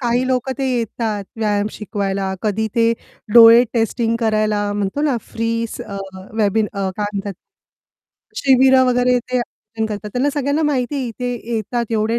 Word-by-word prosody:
काही 245 Hz, +1 st, +1 dB
लोक 255 Hz, 0 st, 0 dB
ते 270 Hz, -, 0 dB
येतात 220 Hz, -3 st, -2 dB
व्यायाम 210 Hz, -2 st, 0 dB
शिकवायला, 195 Hz, -2 st, -3 dB
कधी 220 Hz, +1 st, 0 dB
ते 230 Hz, 0 st, +3 dB, 0.4 s
डोळे 230 Hz, +1 st, +9 dB
टेस्टिंग 230 Hz, 0 st, 0 dB
करायला 215 Hz, -2 st, +1 dB
म्हणतो 205 Hz, +7 st, -2 dB
ना, 280 Hz, -5 st, +1 dB
फ्री 230 Hz, 0 st, -1 dB
स -, -, -9 dB
अ, 200 Hz, -, -7 dB, 0.5 s
वेबिन 210 Hz, +1 st, +2 dB
अ, 195 Hz, -2 st, -2 dB
काय 210 Hz, -1 st, -1 dB
म्हणतात, 200 Hz, 0 st, -4 dB, 1.0 s
शिबिरं 265 Hz, -1 st, +5 dB
वगैरे 250 Hz, 0 st, +3 dB
ते 250 Hz, +1 st, -4 dB
आयोजन 220 Hz, -1 st, -5 dB
करतात. 210 Hz, -1 st, -6 dB
त्यांना 270 Hz, +4 st, +1 dB
सगळ्यांना 285 Hz, +2 st, 0 dB
माहितीये, 270 Hz, -2 st, -1 dB
इथे 245 Hz, +2 st, -4 dB, 0.2 s
येतात 230 Hz, +1 st, -2 dB
एवढे 220 Hz, +2 st, +1 dB
230 Hz, 155 wpm, -19 LUFS, 210-250 Hz, 1.0 s, डोळे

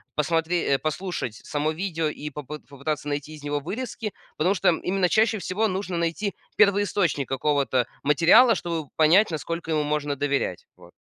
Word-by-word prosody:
посмотре 165 Hz, 0 st, +1 dB
э, -, -, -2 dB
послушать 155 Hz, -, -3 dB
само 150 Hz, +1 st, -1 dB
видео 165 Hz, -2 st, -2 dB
и 150 Hz, 0 st, -5 dB
попы 150 Hz, +1 st, -7 dB
попытаться 145 Hz, +2 st, -5 dB
найти 145 Hz, +1 st, -4 dB
из 150 Hz, -2 st, -12 dB
него 145 Hz, 0 st, -1 dB
вырезки, 220 Hz, -, -5 dB, 0.2 s
потому 185 Hz, +6 st, +2 dB
что -, -, +3 dB
именно 180 Hz, +2 st, +1 dB
чаще 220 Hz, -1 st, +3 dB
всего 210 Hz, +5 st, 0 dB
нужно 185 Hz, -2 st, -3 dB
найти 170 Hz, +5 st, -1 dB, 0.2 s
первоисточник 200 Hz, -8 st, +2 dB
какого-то 135 Hz, -2 st, +1 dB, 0.2 s
материала, 170 Hz, -, +6 dB
чтобы 165 Hz, -4 st, -4 dB
понять, 170 Hz, +6 st, +5 dB
насколько 165 Hz, +2 st, -4 dB
ему 155 Hz, -1 st, +1 dB
можно 145 Hz, -1 st, -1 dB
доверять. 140 Hz, 0 st, -2 dB
Вот. -, -, -16 dB
160 Hz, 155 wpm, -25 LUFS, 145-185 Hz, 0.2 s, материала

